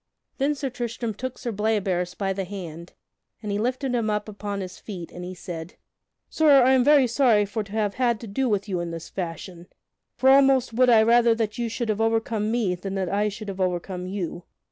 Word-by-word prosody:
Then 285 +2 +1
Sir 270 -2 -4
Tristram 235 -2 -4
took 255 +4 -6
Sir 235 - -4
Bleoberis 195 -4 -1
by 195 -1 -1
the 195 0 -3
hand 175 -3 -8 0.5
and 210 - -3
he 200 - -1
lifted 255 +3 -1
him 230 -3 0
up 210 0 -1
upon 205 -1 -5
his 185 -1 -7
feet, 180 -6 -8
and 180 - -8
he 185 +1 -6
said: 170 -2 -7 0.5
"Sir, 290 -4 +5
I 255 - +5
am 260 -1 +4
very 285 -1 +6
sorry 235 -4 +3
for 210 +2 -3
to 200 - -15
have 210 -2 0
had 240 -3 +1
to 230 - -7
do 250 +6 -1
with 205 -1 0
you 185 -3 -2
in 175 0 -3
this 165 0 -7
fashion, 175 0 -6 0.5
for 265 +1 +4
almost 270 -3 +4
would 250 +2 +4
I 225 -2 +6
rather 235 0 +4
that 225 0 -2
you 235 -1 -1
should 230 0 -3
have 215 0 0
overcome 225 -1 0
me 225 -5 +1
than 190 +2 -5
that 190 -2 -1
I 205 +2 +1
should 210 +1 -8
have 195 -1 -4
overcome 180 0 -2
you. 180 -3 -5
210 Hz, 220 wpm, -25 LUFS, 190-240 Hz, 0.5 s, very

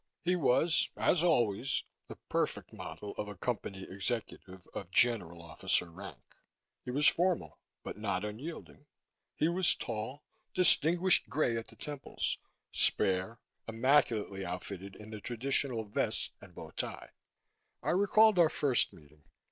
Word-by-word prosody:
He 180 +2 +2
was, 155 +1 +2
as 170 - +3
always, 125 - +1 0.2
the - - -8
perfect - - -1
model 105 - -7
of 105 - -2
a 105 - -7
Company 100 -3 -3
executive 100 -2 -5
of 95 - -6
general 90 -6 +2
officer 85 +1 -1
rank. 95 +4 -9 0.7
He - - -7
was 145 +4 +3
formal, 180 0 +1 0.2
but - - -7
not 100 -2 -1
unyielding. 145 +6 -8 0.5
He 155 - +2
was 175 +1 +3
tall, 115 +5 -5 0.3
distinguished 180 0 +5
gray 125 -3 +1
at 115 0 -4
the - - -15
temples, 145 -2 -4 0.3
spare, 95 +4 +2 0.3
immaculately 115 -4 +2
outfitted 95 +2 -6
in 105 +1 -11
the 110 -1 -7
traditional 125 0 0
vest 105 - -1
and - - -15
bow - - -9
tie. - - -5 0.7
I - - +1
recalled 205 +2 +5
our 165 -2 +6
first 135 -5 +1
meeting. 75 -1 -19
115 Hz, 135 wpm, -32 LUFS, 100-150 Hz, 0.7 s, our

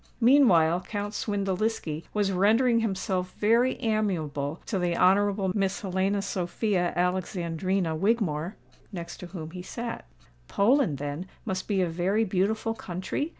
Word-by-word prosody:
Meantime 190 - +5
Count 205 +2 -4
Swindeliski 200 -5 -2
was 205 -2 +1
rendering 225 +6 +3
himself 190 -4 -2
very 235 +4 +3
amiable 165 -9 -1
to 195 - -2
the 175 -1 0
Honourable 195 0 +3
Miss 195 -2 0
Helena 195 +1 0
Sophia 185 0 -1
Alexandrina 180 -1 -1
Wigmore, 185 -3 0 0.4
next 170 -4 -7
to 180 - -8
whom 165 -3 -7
he 180 +1 -7
sate. 235 +5 -5 0.5
"Poland, 225 - +2
then, 145 +6 -5 0.2
must 185 0 -3
be 200 -3 +1
a - - 0
very 185 +6 +1
beautiful 215 +3 0
country?" 190 - -4
190 Hz, 130 wpm, -27 LUFS, 175-215 Hz, 0.5 s, Meantime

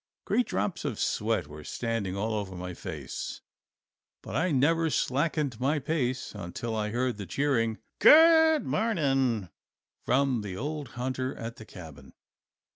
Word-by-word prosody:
Great 250 - +1
drops 195 - -2
of - - -3
sweat - - 0
were 75 +1 -11
standing 110 -1 -3
all 110 +3 -1
over 100 -3 -3
my 90 0 -5
face, - - -6 0.8
but 105 - -7
I 165 +7 +2
never 160 +3 +2
slackened 140 -3 0
my 140 +4 +1
pace 130 -3 -2
until 105 +3 -5
I 105 -1 -1
heard 120 0 -1
the 100 -3 -6
cheering 115 - 0 0.2
"Good 320 -1 +7
morning" 135 - +1 0.5
from 130 -3 +2
the 95 -3 -6
old 145 +3 -4
hunter 130 +1 -2
at 115 0 -6
the 110 - -10
cabin. 80 -9 -12
125 Hz, 140 wpm, -28 LUFS, 105-150 Hz, 0.8 s, Good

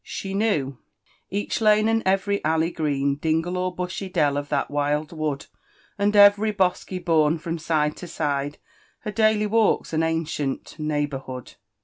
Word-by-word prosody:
She 195 0 -6
knQW 175 - 0 0.3
«* - - -36 0.2
——Each 205 +3 -2
lane, 215 0 +4
and 225 0 +2
every 195 +1 +1
alley 160 +2 +1
green. 140 -3 0
Dingle 160 +3 0
or 180 0 -2
bu«by 180 +2 -4
dell, 150 -6 +1
of 145 0 -3
t|ia| 140 -2 +1
wild 145 +1 -1
wood. 155 -4 -3 0.5
And 205 0 +1
eyery 205 +1 +6
bosky 185 0 0
bourn 165 -3 +2
from 165 +1 -4
sit^e 150 -2 0
to 180 - -8
sJide^ 145 -2 -2 0.5
Her 215 - -4
daily 215 -1 +2
walks, 215 -4 +1
and 160 +1 +1
ancient 160 -3 -2
neighbourhood. 145 -4 -3
165 Hz, 155 wpm, -24 LUFS, 150-200 Hz, 0.5 s, eyery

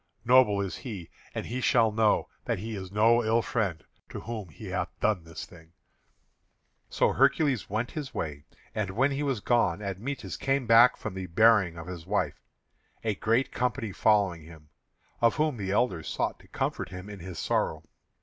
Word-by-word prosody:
Noble 125 -5 +5
is 95 -2 -4
he, 100 -10 -7 0.2
and - - -3
he 125 +2 -4
shall 110 -2 +4
know 110 0 +2 0.2
that - - 0
he 110 +3 -5
is 95 -2 -7
no 115 +3 +4
ill 110 +1 +2
friend 95 -9 -1 0.3
to - - -7
whom 110 -5 -6
he 80 +8 -11
hath 90 -1 -2
done 105 -6 +1
this 80 - -7
thing." 80 -1 -17 1.2
So - - +2
Hercules 140 -2 +2
went 110 +4 -2
his 145 -4 -5
way. 75 -2 -5 0.3
And 105 -3 -2
when 130 +9 +2
he 140 +1 -2
was 135 -7 -1
gone 105 -8 +2
Admetus 105 - -5
came 135 -1 0
back 115 +2 +7
from - - -5
the 95 -1 -5
burying 100 -2 +4
of 80 - -7
his 90 -2 -8
wife, 90 -7 -1 0.6
a 110 -2 +1
great 115 +6 +1
company 115 -4 -1
following 100 -4 +2
him, 80 -1 -14 0.5
of 115 -1 +4
whom 155 -4 +1
the 100 -3 -4
elders 95 -7 0
sought - - -2
to - - -19
comfort - - -3
him 90 +1 -8
in 105 -1 -8
his 90 0 -8
sorrow. - - -1
105 Hz, 180 wpm, -28 LUFS, 90-120 Hz, 1.2 s, back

